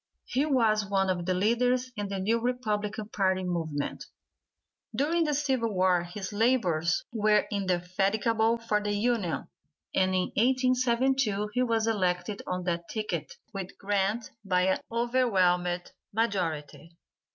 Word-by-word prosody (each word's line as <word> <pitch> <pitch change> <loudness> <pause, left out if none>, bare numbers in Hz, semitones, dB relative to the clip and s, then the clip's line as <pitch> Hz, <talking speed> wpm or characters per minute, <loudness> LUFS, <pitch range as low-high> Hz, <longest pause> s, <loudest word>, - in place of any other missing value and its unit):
He 275 +4 0
was 225 -7 +3
one 195 -1 +2
of 175 -1 -3
the 185 - +1
leaders 245 +6 +1
in 205 -1 -3
the 195 - -3
new 220 +5 +1
Republican 215 -3 -2
party 190 -3 +1
movement. 160 -5 -3 0.9
During 320 +7 +2
the 300 -1 0
civil 265 -5 0
war 185 -2 +3
his 190 +3 -6
labors 195 -8 +1
were 215 -1 +3
indefatigable 200 +4 +1
for 215 -2 0
the 205 0 -1
Union, 205 - 0 0.5
and 185 0 +2
in 185 -1 0
1872 255 -3 +2
he 250 - +1
was 230 -3 +1
elected 185 -2 0
on 180 0 -2
that 170 -1 -2
ticket 220 - -3 0.2
with 195 -1 -6
Grant 205 +3 -1
by 185 -1 +2
an 190 - +1
overwhelming 190 -8 +2 0.3
majority. 170 -6 -2
210 Hz, 130 wpm, -28 LUFS, 185-235 Hz, 0.9 s, was